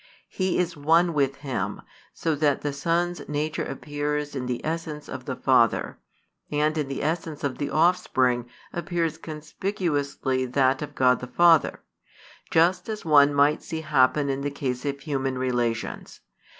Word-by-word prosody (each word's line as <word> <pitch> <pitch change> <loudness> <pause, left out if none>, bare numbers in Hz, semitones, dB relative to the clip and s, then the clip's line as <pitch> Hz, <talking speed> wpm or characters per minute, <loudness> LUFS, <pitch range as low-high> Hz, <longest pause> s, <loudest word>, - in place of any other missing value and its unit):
He 185 -1 -1
is 180 -1 0
One 165 +4 +3
with 140 -2 +1
Him, 140 -3 -4 0.3
so 165 - -1
that 145 -1 +1
the 145 -1 -2
Son's 170 +4 -1
nature 150 +1 -1
appears 145 0 -3
in 125 -2 -3
the 125 -1 -2
essence 155 -2 -4
of 130 -1 -7
the 130 - -3
Father, 125 -5 +2 0.5
and 150 +1 +1
in 150 -3 -1
the 135 - -4
essence 160 -1 -2
of 140 -2 -2
the 145 - -2
Offspring 130 -8 +2 0.2
appears 170 -2 -2
conspicuously 150 -5 -2
that 130 +1 +2
of 150 - -6
God 125 -1 +4
the 125 - -7
Father; 165 +4 +4 0.7
just 175 +4 +2
as 215 -3 -5
one 145 -2 +6
might 145 +1 +3
see 160 -1 -5
happen 145 -1 +3
in 135 0 -1
the 145 - -1
case 130 -3 -3
of 140 -1 -3
human 135 -2 -2
relations. 120 -3 -2
145 Hz, 155 wpm, -25 LUFS, 135-160 Hz, 0.7 s, one